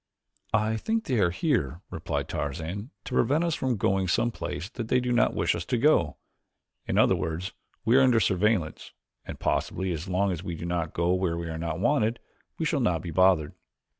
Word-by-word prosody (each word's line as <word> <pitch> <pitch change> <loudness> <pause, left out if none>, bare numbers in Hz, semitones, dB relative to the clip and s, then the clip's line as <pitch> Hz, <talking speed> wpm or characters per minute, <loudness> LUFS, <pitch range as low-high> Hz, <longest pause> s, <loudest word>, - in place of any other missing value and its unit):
"I 110 +1 +1
think 225 - -1
they 125 -4 0
are 90 - +4
here," 90 - -1
replied - - -3
Tarzan, 80 - -4
"to - - -7
prevent 145 +7 +2
us 170 -1 0
from 130 -5 -1
going 95 -1 +1
some 115 +7 +1
place 90 -5 -5
that 115 -2 -5
they 125 - +3
do 125 0 -1
not 120 - +3
wish 85 0 +2
us 85 - -3
to 125 - 0
go; 115 - +3 0.7
in - - 0
other - - +5
words 85 +5 -3 0.3
we 115 +3 +4
are - - +6
under 125 -3 +5
surveillance, 95 -3 0 0.3
and - - -7
possibly 95 -1 -1
as 80 +2 -4
long 95 +2 +1
as 85 -3 -3
we 85 -3 -4
don't 85 0 -2
go 85 +1 +2
where 90 -2 0
we 85 -1 -4
are 80 0 -4
not 80 -1 -3
wanted 115 0 +2 0.4
we 160 - -1
shall 155 -2 +1
not 90 -10 +1
be 85 - -5
bothered." 90 -3 +3
95 Hz, 200 wpm, -27 LUFS, 85-120 Hz, 0.7 s, are